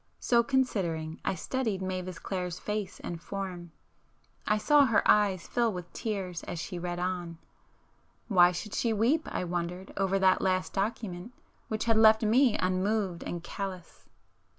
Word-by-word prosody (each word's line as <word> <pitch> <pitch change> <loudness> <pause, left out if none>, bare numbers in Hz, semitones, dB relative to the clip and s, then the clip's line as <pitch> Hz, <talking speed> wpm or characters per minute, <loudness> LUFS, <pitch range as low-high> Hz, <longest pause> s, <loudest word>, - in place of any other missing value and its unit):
So 235 -1 +3
considering, 190 -12 -1
I - - 0
studied 225 +1 -2
Mavis 185 -1 -4
Clare's 180 -2 -4
face 210 -2 -4
and 170 -1 -6
form,—I 185 +3 -6
saw 285 +6 +5
her 225 -3 +2
eyes 200 -4 +3
fill 235 -2 +1
with 180 -3 -8
tears 195 -7 -3
as 175 - -5
she 175 +2 -5
read 175 0 -3
on;—why 175 +1 -1
should 195 +4 -6
she 230 -2 +1
weep, 245 +10 +2
I - - -2
wondered, 175 +1 -4
over 195 0 +1
that 190 -1 +4
'last 185 -1 0
document' 200 0 -3 0.3
which 220 0 -2
had 225 -1 +3
left 220 0 +6
me 230 +1 +4
unmoved 185 0 0
and 175 -1 -5
callous? 185 -3 -7
190 Hz, 145 wpm, -29 LUFS, 180-220 Hz, 0.3 s, left